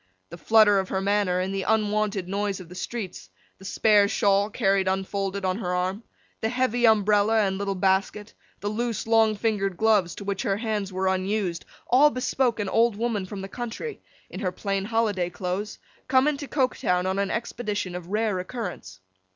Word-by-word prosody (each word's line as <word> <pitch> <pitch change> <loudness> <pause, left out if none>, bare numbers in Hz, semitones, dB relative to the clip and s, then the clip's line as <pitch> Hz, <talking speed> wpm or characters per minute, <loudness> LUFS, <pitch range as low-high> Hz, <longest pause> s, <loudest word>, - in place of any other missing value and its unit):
The 170 - -8
flutter 215 -1 +5
of 190 - -3
her 190 - -1
manner, 200 -2 +1
in 185 +1 -2
the 195 0 -2
unwonted 210 -2 0
noise 200 0 -2
of 180 -3 -11
the - - -10
streets; 195 0 -6 0.3
the 195 - -13
spare 205 0 +4
shawl, 200 0 +2
carried 195 -2 +1
unfolded 195 +1 -2
on 185 +2 0
her 180 -5 -2
arm; 185 +4 -1 0.4
the 220 - 0
heavy 245 -1 +2
umbrella, 215 0 +4
and 190 -1 0
little 200 -1 -2
basket; 195 +3 0 0.3
the 205 - -3
loose 230 +1 -2
long 225 -1 +4
fingered 200 -4 -1
gloves, 210 -5 +2
to - - -8
which 200 -1 -2
her 195 -1 0
hands 210 -3 -2
were 190 +1 -2
unused; 190 -1 -1 0.2
all 275 +5 +6
bespoke 255 -3 0
an 205 - -1
old 230 +2 +2
woman 215 -3 -2
from 195 0 -6
the 195 - -6
country, 240 - -6 0.3
in - - -6
her 185 -3 -1
plain 195 +1 -2
holiday 210 -5 0
clothes, 185 +3 -4 0.3
come 260 +2 +4
into 290 -1 -1
Coketown 245 -11 0
on 190 +1 -1
an 200 -1 0
expedition 210 -5 -3
of 180 -1 -7
rare 210 -1 0
occurrence. 180 - -6
200 Hz, 185 wpm, -25 LUFS, 190-220 Hz, 0.4 s, all